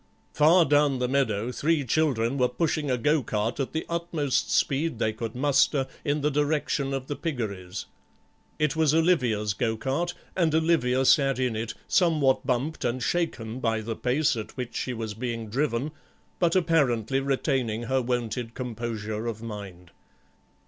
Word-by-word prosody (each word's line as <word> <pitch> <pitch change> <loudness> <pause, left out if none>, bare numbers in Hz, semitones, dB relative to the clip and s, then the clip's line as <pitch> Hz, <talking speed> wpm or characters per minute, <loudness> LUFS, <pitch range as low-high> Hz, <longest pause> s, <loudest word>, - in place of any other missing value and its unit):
Far 165 +3 +5
down 145 -1 +3
the 125 0 0
meadow 125 -4 0
three 150 +2 +1
children 130 -3 +1
were 125 -1 +3
pushing 150 +2 -1
a 125 - +1
go 150 +5 +2
cart 110 +2 -2
at 135 - -1
the 160 - -3
utmost 170 -5 -1
speed 145 -1 +1
they 110 -1 0
could 110 +1 -5
muster 140 +1 +3 0.2
in 145 +1 0
the 150 +1 +1
direction 145 -1 0
of 135 -1 -3
the 145 - -4
piggeries; 105 - -4 0.7
it 150 -1 +1
was 160 -2 +3
Olivia's 125 - +2
go 110 0 -1
cart 155 +9 -2 0.2
and 165 -4 +2
Olivia 155 -6 +2
sat 135 -1 +4
in 125 -3 0
it, 110 +1 -4
somewhat 150 -8 +2
bumped 135 +5 -1
and 120 +1 -1
shaken 130 -9 -1
by 115 -3 0
the 110 +1 -4
pace 135 +5 +1
at 110 +3 -7
which 125 -2 -5
she 130 - -2
was 110 -3 -4
being 115 -1 -4
driven, 135 +2 0 0.5
but 170 -1 +2
apparently 135 - +2
retaining 135 -4 -1
her 130 +3 +1
wonted 120 -1 -2
composure 115 -3 -4
of 110 -1 -5
mind. 95 -6 -8
130 Hz, 160 wpm, -26 LUFS, 115-150 Hz, 0.7 s, Far